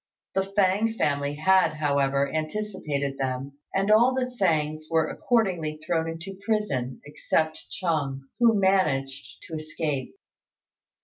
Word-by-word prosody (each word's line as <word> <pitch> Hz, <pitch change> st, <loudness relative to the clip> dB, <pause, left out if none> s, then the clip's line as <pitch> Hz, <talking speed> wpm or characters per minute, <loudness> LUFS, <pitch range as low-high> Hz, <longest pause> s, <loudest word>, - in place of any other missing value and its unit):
The 195 Hz, -, +2 dB, 0.2 s
Fêng 205 Hz, +3 st, +3 dB
family 145 Hz, 0 st, 0 dB
had, 185 Hz, +2 st, +3 dB
however, 140 Hz, -2 st, +1 dB
anticipated 155 Hz, -5 st, -2 dB
them, 135 Hz, +1 st, -3 dB
and 195 Hz, +2 st, +1 dB
all 240 Hz, +4 st, +5 dB
the 260 Hz, -1 st, +1 dB
Tsêngs 155 Hz, -10 st, 0 dB
were 160 Hz, -1 st, +2 dB
accordingly 180 Hz, -10 st, 0 dB
thrown 165 Hz, 0 st, 0 dB
into 180 Hz, +4 st, -7 dB
prison, 200 Hz, -, -1 dB
except 155 Hz, +1 st, -1 dB
Chung, 145 Hz, -7 st, -2 dB, 0.2 s
who 230 Hz, -3 st, +5 dB
managed 140 Hz, -8 st, 0 dB
to -, -, -11 dB
escape. 155 Hz, -, -3 dB
155 Hz, 120 wpm, -26 LUFS, 140-195 Hz, 0.2 s, all